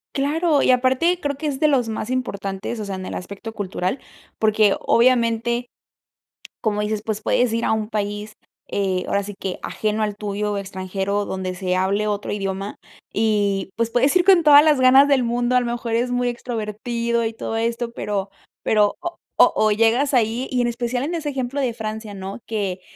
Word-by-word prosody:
Claro, 295 +2 +2
y - - +5
aparte 260 +8 +2
creo 285 -1 -1
que 310 - -3
es 275 -2 -3
de 305 - +4
los 255 -6 +2
más 220 +1 -4
importantes, 200 -4 -3
o 210 - -4
sea, 195 -1 -4
en 185 0 -6
el - - -6
aspecto 200 +5 -7
cultural, 195 +3 -3 0.4
porque, 215 -2 +3
obviamente, 235 0 +2 0.9
como 210 -2 0
dices, 210 0 -2
pues, 215 -1 -3
puedes 245 +1 +2
ir 230 - 0
a - - +1
un 220 -1 -1
país, 210 0 -3 0.3
eh, 190 -2 -1
ahora 200 - 0
sí 205 +1 -7
que, 190 -2 -3
ajeno 215 0 -1
al 210 -1 -2
tuyo, 205 0 -2
extranjero, 195 +1 -3
donde 185 -1 -4
se 180 -1 -1
hable 195 +3 +1
otro 205 -1 -2
idioma, 195 0 -3 0.4
y 205 -3 0
pues, 230 0 0
puedes 260 +7 +2
ir 360 - +5
con 370 -4 +6
todas 290 -1 +8
las 305 -3 +4
ganas 260 +2 +7
del 275 -3 +3
mundo, 240 +1 0
a 250 - +6
lo 245 - -3
mejor, 235 -1 -3
eres 245 +2 +1
muy 245 0 0
extrovertido 235 0 -2
y 225 - -2
todo 225 - -5
esto, 235 +1 -1
pero 205 -4 -3 0.3
pero 210 -1 +2
o 345 -1 -4 0.3
o - - +6
o 215 0 +3
llegas 230 +6 +2
ahí, 240 +1 +1
y 255 - 0
en 245 - +2
especial, 240 +1 -2
en 340 +3 -2
ese 310 -3 -3
ejemplo 270 0 -2
de 250 -3 0
Francia, 220 -1 -5
¿no?, 195 +2 -7
que 195 -4 -3
225 Hz, 195 wpm, -22 LUFS, 205-250 Hz, 0.9 s, todas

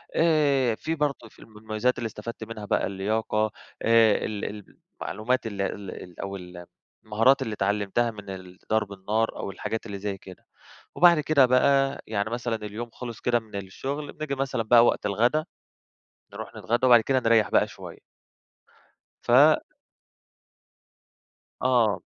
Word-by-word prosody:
آآ 145 -7 +3
في 160 +7 -3
برضه 140 -6 -2
في - - -23
ال - - -14
من 105 - -16
المميزات 110 +3 -1
اللي 120 -2 -2
استفدت 110 +2 -8
منها 110 -2 -7
بقى - - 0
اللياقة 105 +2 -1 0.3
آآ 115 -1 +4
ال 105 -1 -5 0.4
المعلومات 115 +4 -1
ال 100 -3 -4
ال 95 -3 -6
أو 100 0 -5
ال 90 -1 -10 0.4
المهارات 115 +6 +3
اللي 115 -5 -3
إتعلّمتها 105 +3 0
من 105 -2 -11
الضرب 95 +3 -4
النار 105 +4 -1
أو 100 - -4
الحاجات 110 +4 -5
اللي 100 -2 -6
زي 100 -1 -4
كده، 95 -1 -14 0.5
وبعد 170 -2 +6
كده 145 -3 +4
بقى 135 +2 +3
يعني 105 0 -2
مثلًا 120 -1 -2
اليوم 110 +2 -7
خلص 120 -3 -8
كده 120 -1 +2
من 110 -2 -11
الشغل، 135 +10 -5
نيجي 150 -2 -2
مثلًا 135 -3 -2
بقى 115 +1 +6
وقت - - 0
الغدا، 120 +10 +1 0.9
نروح - - -8
نتغدى 120 +3 0
وبعد 120 -2 +7
كده 130 +3 +1
نريّح 115 -2 +3
بقى - - +3
شوية. - - -11 1.2
ف - - -12 2.3
آه. 115 -7 +2
110 Hz, 145 wpm, -26 LUFS, 105-125 Hz, 2.3 s, وبعد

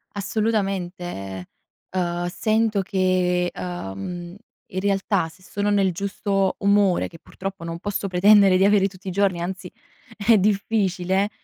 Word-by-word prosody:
Assolutamente, 190 - -2 0.5
uhm, 175 -1 -1
sento 215 +2 +1
che, 180 -2 +1
uhm, 175 - -6 0.3
in 185 - -4
realtà 195 -2 +1
se 185 +3 -17
sono 200 +3 -2
nel 195 -2 +3
giusto 195 +1 -1
umore, 200 -2 +3
che 165 - -13
purtroppo 195 0 -7
non 165 0 -5
posso 200 0 -3
pretendere 195 +1 +6
di 190 - +3
avere 200 -1 +4
tutti 190 0 -13
i - - -1
giorni, 185 -2 +1
anzi 180 0 -5 0.6
è 225 -2 +7
difficile, 195 -1 +1
190 Hz, 130 wpm, -23 LUFS, 180-200 Hz, 0.6 s, è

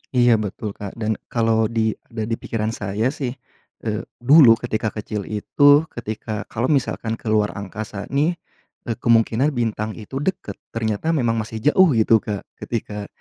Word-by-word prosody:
Iya 120 -1 +5
betul 105 0 -3
Kak, 100 -2 -7
dan 110 -1 0 0.2
kalau 115 -1 +2
di 110 -1 +1 0.2
ada 110 -1 -3
di 115 - 0
pikiran 110 -1 -3
saya 105 +4 -1
sih, 135 -5 -3 0.5
eee, 110 -1 -2 0.2
dulu 130 -1 +8
ketika 110 -2 -2
kecil 105 -1 -4
itu 145 +8 +4
ketika 110 -1 -5
kalau 120 +3 -1
misalkan 120 -5 0
ke - - -8
luar 105 -1 +1
angkasa 100 0 -6
nih, 155 +5 +2 0.5
eee, 115 - -2
kemungkinan 115 +3 +3
bintang 110 -2 -1
itu 125 +5 -6
deket 145 - -3 0.2
ternyata 115 +8 0
memang 120 -5 +1
masih 110 +1 -6
jauh 185 +4 +6
gitu 110 0 +5
Kak, 100 -1 -5 0.2
ketika, 105 -3 -4
115 Hz, 160 wpm, -22 LUFS, 105-120 Hz, 0.5 s, dulu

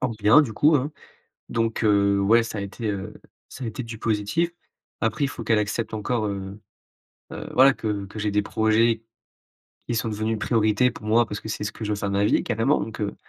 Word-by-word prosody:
en 130 - 0
bien 110 +4 +5
du 120 -8 -2
coup, 150 +7 +4
hein. 145 +1 +1 0.6
Donc, 115 0 -1
heu, 100 -1 +3
ouais, 115 +4 +4
ça 110 -2 -5
a - - -2
été, 110 +3 -5
heu 95 -2 -5 0.3
ça - - -10
a 115 - -2
été 125 +2 -5
du 115 -1 -8
positif. 110 +10 0 0.5
Après 115 +5 -1
il 140 - +3
faut 115 - -7
qu'elle 110 -1 +3
accepte 110 +2 -3
encore, 110 +1 -1
heu 100 0 -5 0.7
heu, - - -7
voilà, 135 +2 +7
que 105 -5 -3
que 110 +2 -9
j'ai 105 0 -1
des 105 - +2
projets 110 +2 +2 0.8
qui 120 - -1
sont 115 - -1
devenus 110 +1 -1
une 110 - -3
priorité 110 +2 +2
pour 110 - -11
moi, 115 +2 +4
parce 105 -2 -6
que 110 - -8
c'est 105 - -3
ce 105 - -3
que 110 - -9
je 105 - -3
veux 105 - +1
faire 100 0 -3
de - - -2
ma 100 - +3
vie - - +2
carrément. 115 +7 +1
Donc, 110 -1 -5
heu, 100 -1 -2
110 Hz, 235 wpm, -24 LUFS, 105-115 Hz, 0.8 s, voilà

